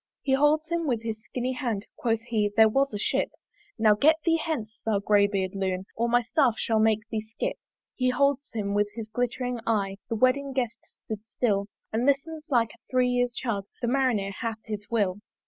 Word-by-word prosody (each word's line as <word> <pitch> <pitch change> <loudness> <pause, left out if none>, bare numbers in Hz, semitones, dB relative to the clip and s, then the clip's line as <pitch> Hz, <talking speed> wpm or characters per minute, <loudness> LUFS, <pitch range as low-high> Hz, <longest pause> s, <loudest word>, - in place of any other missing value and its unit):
He 270 - +1
holds 300 +3 +3
him 340 -2 -1
with 235 -4 0
his 220 -1 -4
skinny 250 +2 -3
hand, 235 -6 -2
Quoth 225 -2 0
he, 220 -3 0
there 220 0 +8
was 275 +5 +2
a 210 - -3
Ship 205 - 0 0.5
"Now 220 -2 +5
get 295 +10 +5
thee 330 -1 +3
hence, 230 -10 -4
thou 220 -2 +1
grey 200 0 +4
beard 190 -2 -2
Loon! 190 -1 -2
"Or 235 +1 0
my 245 +1 +3
Staff 260 -2 +2
shall 225 -1 +1
make 215 0 +2
thee 220 -2 -1
skip." 220 +1 -4 0.4
He 255 -1 +1
holds 280 +2 +1
him 205 -3 -2
with 205 0 +2
his 225 -2 -6
glittering 245 +1 -2
eye 195 -3 0
The 230 - -1
wedding 265 +4 +2
guest 245 -3 -1 0.3
stood 215 -1 -5
still 200 -5 0 0.3
And 235 +4 +1
listens 305 +3 0
like 235 -5 +2
a - - -18
three 255 -1 +3
year's 245 -1 +1
child; 205 -6 -2
The 240 - -1
Marinere 240 -6 +1
hath 225 +1 -3
his 210 -1 -6
will. 205 -4 +1
230 Hz, 200 wpm, -27 LUFS, 210-255 Hz, 0.5 s, there